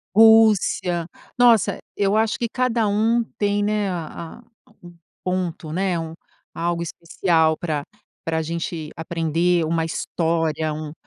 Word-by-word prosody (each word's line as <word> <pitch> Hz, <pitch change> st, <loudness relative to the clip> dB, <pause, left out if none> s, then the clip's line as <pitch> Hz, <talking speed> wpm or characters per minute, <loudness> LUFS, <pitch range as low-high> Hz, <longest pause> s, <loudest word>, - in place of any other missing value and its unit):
Rússia. 215 Hz, -6 st, +5 dB, 0.3 s
Nossa, 235 Hz, -4 st, +4 dB, 0.2 s
eu 200 Hz, +1 st, +2 dB
acho 220 Hz, 0 st, +2 dB
que 235 Hz, -, -1 dB
cada 240 Hz, -3 st, 0 dB
um 225 Hz, +3 st, +2 dB, 0.2 s
tem, 205 Hz, 0 st, +1 dB
né, 210 Hz, -1 st, 0 dB
a 170 Hz, +4 st, -7 dB, 0.2 s
a -, -, -25 dB
um 175 Hz, -1 st, -13 dB, 0.3 s
ponto 180 Hz, -3 st, -2 dB
um, -, -, -6 dB
né, 185 Hz, 0 st, 0 dB
um 160 Hz, 0 st, -5 dB, 0.4 s
algo 170 Hz, 0 st, -1 dB
especial 165 Hz, -1 st, +1 dB
pra 155 Hz, -4 st, -3 dB, 0.4 s
pra 160 Hz, 0 st, -1 dB
gente 165 Hz, -1 st, -4 dB
aprender, 165 Hz, +1 st, 0 dB
uma 165 Hz, 0 st, 0 dB
história 160 Hz, -1 st, -1 dB
um, 155 Hz, -1 st, -6 dB
175 Hz, 135 wpm, -22 LUFS, 160-205 Hz, 0.4 s, Rússia